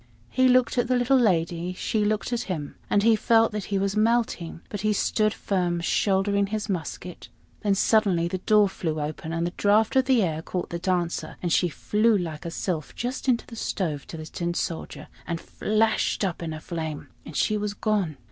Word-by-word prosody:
He 260 0 +4
looked 255 0 +3
at 240 - +1
the 255 - +2
little 250 +2 +3
lady, 175 -4 +1
she 210 +3 -1
looked 215 +3 -1
at 235 - 0
him, 150 -6 -3 0.2
and 205 - +3
he 225 0 +6
felt 225 +1 +3
that 210 -2 -4
he 200 - -1
was 195 +1 0
melting; 215 -7 0
but 205 - -5
he 215 +1 +2
still 215 +1 +2
stood - - -6
firm, 180 -3 0
shouldering 200 +3 +1
his 215 +1 -3
musket. 180 -1 -5 0.3
Then 200 -2 +2
suddenly 195 -5 +3
the 185 +2 -3
door 210 +2 +4
flew 160 -4 -3
open, 155 +3 -4
and 165 +1 -1
the 175 - -3
draught 210 +4 +3
of 265 0 +3
air 185 -12 +2
caught 180 +2 -4
the 170 - -3
Dancer, 175 -3 -1
and 175 -2 +1
she 180 - +3
flew 215 +7 +2
like 165 -4 -5
a - - -2
sylph 165 -3 -3
just 255 +3 -3
into 240 -2 +2
the 230 - -10
stove 160 -10 -3
to 165 - -7
the 155 - -7
Tin 170 +2 -3
Soldier, 165 -2 -4 0.2
and 170 -1 -2
flashed 215 +1 0
up 175 -3 -3
in 165 -1 -3
a 155 - -5
flame, 160 -2 -5
and 155 - -10
she 215 - +2
was 210 -1 -2
gone. 205 -9 0
195 Hz, 205 wpm, -25 LUFS, 170-215 Hz, 0.3 s, he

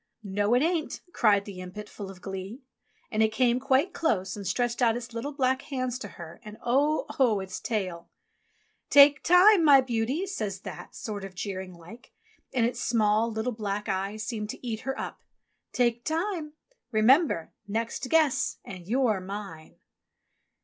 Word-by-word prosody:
"No, 205 +3 +1
it 250 - +3
ain't," 330 -2 -1
cried 205 -3 +3
the 195 -3 -8
impet, 185 +3 -8
full 200 -2 -8
of 185 -2 -12
glee. 195 +6 -6 0.5
And 215 - +1
it 220 0 +3
came 245 +1 +2
quite 270 +7 +2
close 195 - 0
and 200 -2 -6
stretched 245 0 -1
out 235 -1 +3
its 240 -1 -8
little 235 +5 -4
black 260 -2 +1
hands 255 -2 -3
to 210 - -6
her, 170 -2 -11
and 210 -1 -10
0 285 +6 +2
oh, 230 -6 +4
its 190 -1 -6
tail...!!! 185 -7 -3 0.8
"Take 285 +1 +7
time, 360 +2 +6
my 285 -3 +8
beauty," 255 +7 -1
says 210 - -4
That, - - -9
sort 205 -3 -5
of 195 -1 -8
jeering 190 -1 -5
like, 175 +8 -14 0.4
and 240 -3 +2
its 240 0 -2
small, 220 -1 +2
little, 220 +3 -2
black 210 -2 -3
eyes 195 +3 -2
seemed 210 0 -4
to 245 - -7
eat 220 -2 -2
her 270 +2 -4
up. - - -6 0.5
"Take 240 -1 +1
time! 325 -1 -2 0.4
Remember! 230 - +3 0.2
next 230 +4 -3
guess 315 -5 +2
and 180 -2 -9
you're 235 -3 +2
mine!" 190 -4 -8
225 Hz, 165 wpm, -27 LUFS, 200-265 Hz, 0.8 s, my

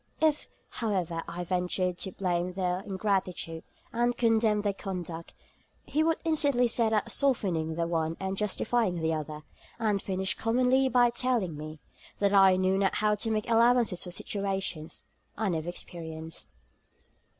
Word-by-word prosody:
If, 310 -2 +1 0.2
however, 185 -7 -2
I 170 +1 -4
ventured 180 0 -1
to 190 - -3
blame 180 -1 -1
their 180 -1 -1
ingratitude, 190 -4 -2 0.3
and 240 +1 +1
condemn 225 -2 +3
their 205 -1 +1
conduct, 175 -4 -6 0.5
he 305 - 0
would 325 0 +2
instantly 285 -6 +3
set 230 0 +2
about 220 -2 0
softening 180 - +1
the 170 0 0
one 165 -1 -1
and 190 0 -2
justifying 210 0 0
the 160 -1 0
other; 155 -1 -5 0.3
and 210 -4 +1
finished 190 0 -2
commonly 255 +3 +3
by 245 -2 +4
telling 235 -9 0
me, 155 +1 -8 0.4
that 200 0 +2
I 195 -2 +7
knew 185 +1 +2
not 195 -1 +2
how 210 0 +2
to 210 +2 -2
make 215 0 -1
allowances 235 -4 +3
for 180 - -7
situations 190 -4 -3 0.3
I 220 -2 0
never 165 -1 -2
experienced.' 160 -2 -7
195 Hz, 150 wpm, -29 LUFS, 175-225 Hz, 0.5 s, I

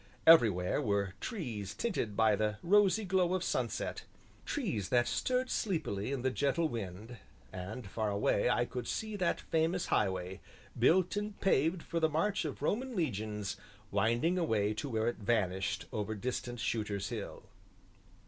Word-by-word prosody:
Everywhere 110 - +6
were 100 -2 0
trees 120 - -4
tinted 120 - -2
by 110 -2 +5
the 105 0 -1
rosy 205 +2 +4
glow 185 -1 +2
of 185 - -1
sunset, - - -2 0.4
trees 175 - -2
that 120 -1 +3
stirred 255 0 0
sleepily 155 - -1
in 135 -3 -2
the 130 - +2
gentle 145 +5 +1
wind, 110 - -6 0.4
and 95 +6 -6
far 105 +2 -2
away 100 +2 +2
I 120 0 +2
could 125 0 -5
see 215 -1 -3
that 185 -3 +1
famous 165 +2 0
highway, 95 -2 0 0.3
built 175 - +3
and 210 0 -4
paved 165 -1 +2
for 170 - -2
the 160 -1 +3
march 165 +4 0
of 145 -1 -5
Roman 245 - -1
Legions, 105 - -2 0.3
winding 120 - +2
away 110 - +1
to 135 +7 -4
where 110 -2 0
it 120 - -1
vanished 95 -4 0
over 110 0 -2
distant 120 +2 -4
Shooter's 105 -3 -2
Hill. 110 -4 -6
120 Hz, 150 wpm, -33 LUFS, 105-170 Hz, 0.4 s, Everywhere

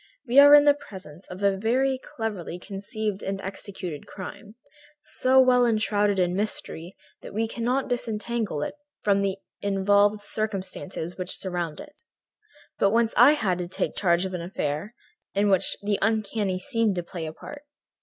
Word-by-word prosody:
We 250 +4 +6
are 285 +1 +10
in 290 - +8
the 290 -1 +6
presence 190 - -11
of 185 +2 -8
a 200 -1 +3
very 260 +5 +1
cleverly 210 -9 -5
conceived 200 +2 -4
and 195 0 -3
executed 190 -5 -7
crime, 205 +2 -9 0.4
so 260 -2 +2
well 255 -1 +5
enshrouded 210 -3 +2
in 180 -1 +1
mystery 190 -4 -4 0.3
that - - -10
we 225 +1 0
cannot 245 +4 -1
disentangle 225 - -2
it - - -4 0.3
from 200 -1 +3
the 195 -1 -1 0.2
involved 205 +1 +2
circumstances 190 -5 -3
which 180 0 0
surround 175 -4 -3
it. 295 0 -11 0.9
But 195 - +4
once 230 +1 +2
I 260 +5 +8
had 195 -12 0
to 175 - -3
take 180 - -2
charge 175 -1 +2
of 190 - -5
an 180 - -3
affair 170 +4 -3 0.4
in 200 0 +3
which 190 - +3
the 205 0 0
uncanny 210 -3 0
seemed 230 -1 0
to 175 - -2
play 170 -1 -6
a 155 - -6
part. 290 - -10
205 Hz, 165 wpm, -26 LUFS, 185-230 Hz, 0.9 s, are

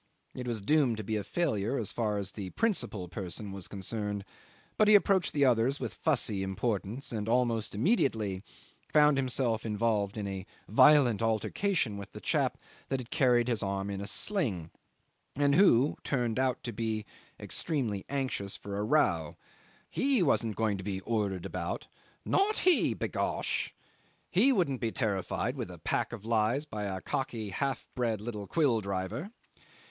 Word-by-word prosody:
It 125 -1 -6
was 115 -4 -2
doomed 135 -2 +3
to 110 - -4
be 110 +2 -2
a 105 - -1
failure 130 - 0
as 110 - -2
far 105 -3 -1
as 100 -1 -3
the 95 -3 -6
principal 145 - -1
person 95 +2 -5
was 95 -2 -6
concerned, 105 0 -4 0.5
but 215 - +4
he 210 - +8
approached 195 -3 +4
the 145 -2 +3
others 125 +3 +3
with - - -4
fussy 120 -10 +1
importance, 100 +5 -2
and, 110 -2 -3
almost 115 -3 +1
immediately, 110 - +1 0.5
found 150 -1 +5
himself 125 -4 0
involved 105 -2 0
in 105 - -3
a 95 -1 -5 0.2
violent 120 -1 +6
altercation 115 - 0
with 100 0 -9
the - - -7
chap - - 0 0.3
that 130 -3 -3
carried 125 -6 +3
his 120 -3 0
arm 100 0 -2
in 100 0 -4
a 100 - -4
sling, 110 - 0 0.6
and 145 0 +3
who 145 -7 +5
turned 125 -4 0
out 130 -2 0
to 120 - -3
be 110 -1 -2 0.3
extremely 120 - -1
anxious 130 -8 -2
for 100 0 -6
a - - 0
row. 95 - +1 0.5
He 265 -7 +2
wasn't 115 -8 +1
going 110 -3 0
to - - -6
be 95 -1 -3
ordered 100 -5 -1
about - - -4 0.4
"not 410 +2 +2
he, 365 -2 +4
b'gosh." - - -1 0.6
He 230 +10 +5
wouldn't 170 - +1
be 115 -2 0
terrified 100 -5 -1
with - - -4
a - - -9
pack - - -1
of 100 - -8
lies 115 +5 +1
by 105 -8 -5
a 95 -2 -3
cocky 115 -5 -3
half 135 +7 -2
bred 115 -4 0
little 105 -2 -5
quill 135 -9 +2
driver. 100 - -3
115 Hz, 165 wpm, -30 LUFS, 100-140 Hz, 0.6 s, he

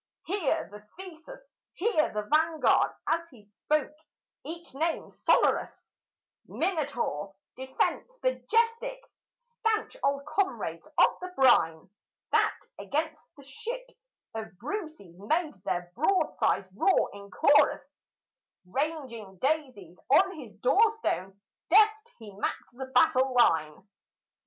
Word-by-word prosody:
"Here, 360 -5 -1
the 210 0 -10 0.2
Theseus 380 +8 -11 0.3
here, 365 -6 +1
the 210 0 -2
Vanguard;" 315 0 +3
as 335 +1 -1
he 235 -8 -17
spoke 295 +9 -2 0.5
each 335 0 -9
name 320 +4 -2
sonorous, - - +1 0.6
Minotaur, 275 - -2 0.2
Defence, 265 - -2
Majestic, 485 0 0 0.4
stanch 460 -2 -2
old 280 0 0
comrades 375 +6 -2
of - - +4
the 365 0 -7
brine, 165 -12 +4 0.4
That - - +2 0.2
against 310 +1 -2 0.2
the 280 - -13
ships - - -8 0.2
of 220 -4 -7
Brucys 290 - -6
made 310 - 0
their 175 0 -2
broadsides 340 - +1
roar 385 - +2
in 200 0 -11
chorus, 290 +6 +2 0.6
Ranging 235 - -4
daisies 260 - -2
on 380 +7 +4
his 225 -8 -11
doorstone, 250 - +1 0.3
deft 435 +4 +4
he 215 -3 -11
mapped 200 - -4
the 260 +2 -7
battle 265 -2 +3
line. 160 -6 +2
305 Hz, 110 wpm, -28 LUFS, -, 0.6 s, of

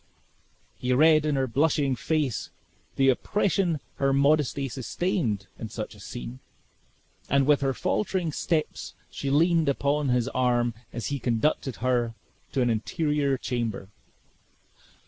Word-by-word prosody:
He 125 0 0
read 155 +2 +5
in 150 - +1
her 135 -1 +1
blushing 140 +1 +1
face, 150 -1 -1 0.5
the 135 0 +4
oppression 175 - +1 0.2
her 135 0 +2
modesty 140 0 +2
sustained 130 - -2
in 110 - -5
such - - -5
a - - -15
scene, - - -7 0.9
and 140 0 +3
with 145 0 +4
her 135 -1 +2
faltering 185 -3 -1
steps 155 +1 -2 0.2
she 140 - -4
leaned 165 +2 +3
upon 140 +1 +1
his 125 -1 +2
arm 120 -2 +1 0.2
as 120 -2 -4
he 140 - -2
conducted 125 +2 0
her 120 -2 +1 0.4
to 130 - +1
an 120 - +2
interior 140 +4 0
chamber. 115 -6 -3
135 Hz, 130 wpm, -26 LUFS, 125-155 Hz, 0.9 s, read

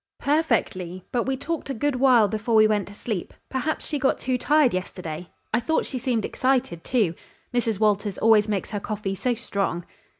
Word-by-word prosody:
"Perfectly, 200 - 0
but 240 -2 0
we 265 0 0
talked 320 +2 -4
a 270 - -2
good 290 +2 0
while 250 -5 +5
before 220 +2 -1
we 215 0 +7
went 210 -2 +1
to 205 - -10
sleep. 205 -5 -4
Perhaps 265 +4 -2
she 295 - -2
got 270 0 +2
too 255 0 -1
tired 285 +1 +3
yesterday. 180 -2 -5 0.2
I 225 - +4
thought 315 +7 0
she 260 - -4
seemed 240 -4 0
excited, 255 -10 0
too. 215 -10 +1 0.4
Mrs. 230 -4 0
Walters 205 -2 +1
always 220 -1 +5
makes 205 0 -2
her 205 - -2
coffee 205 -1 -3
so 245 +5 0
strong." 195 -6 -2
225 Hz, 190 wpm, -25 LUFS, 200-260 Hz, 0.4 s, we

